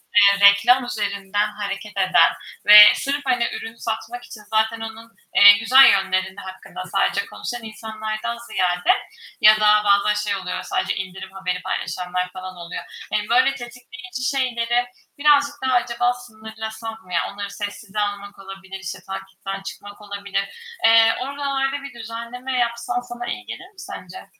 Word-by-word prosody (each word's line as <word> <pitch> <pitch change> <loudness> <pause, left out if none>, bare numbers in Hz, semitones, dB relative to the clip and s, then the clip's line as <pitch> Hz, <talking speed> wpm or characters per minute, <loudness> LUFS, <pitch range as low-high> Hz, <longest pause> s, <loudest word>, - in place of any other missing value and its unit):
eee, 200 0 +7
reklam 245 +6 +3
üzerinden 205 -2 -2
hareket 205 0 -6
eden 185 -1 +4 0.3
ve 210 0 +10 0.2
sırf, 285 +1 -2
hani, 245 -3 +1
ürün 225 0 -7
satmak 230 +1 -5
için 215 - -11
zaten 220 +1 +1
onun, 225 +1 -9 0.2
eee, 205 0 +10
güzel 255 +4 +7
yönlerinin 190 -1 0
hakkında, 190 -1 -9
sadece 200 0 +1
konuşan 240 +3 -7
insanlardan 220 +1 -5
ziyade 180 -3 0 0.5
ya 215 0 +8
da 210 0 +4
bazen 200 +1 +3 0.2
şey - - +1
oluyor, 185 -1 -5
sadece - - -2
indirim 190 0 -7
haberi 185 -1 -4
paylaşanlar 180 +1 -3
falan 185 0 -8
oluyor. 170 0 -7 0.3
Eee, - - +1
böyle 255 +3 +3
tetikleyici 250 0 -9
şeyleri 245 -2 0 0.3
birazcık 290 0 +3
daha 260 - +1
acaba 245 0 +1
sınırlasan 220 -1 -8
mı 180 - -12
ya? 165 - +2
Onları 200 0 -6
sessize 205 0 -6
almak 205 -1 -4
olabilir, 195 0 -10
işte 185 0 -7
takipten 195 0 -7
çıkmak 205 +1 -10
olabilir. 200 -1 -4 0.4
Eee, 225 0 +6
oralarda 275 0 -2
bir 275 -3 -9
düzenleme 235 +3 -6
yapsan 235 +1 -1
sana 240 0 -8
iyi 245 - -5
gelir 370 - -8
mi 410 - -32
sence? 185 - -9
215 Hz, 150 wpm, -21 LUFS, 195-240 Hz, 0.5 s, ve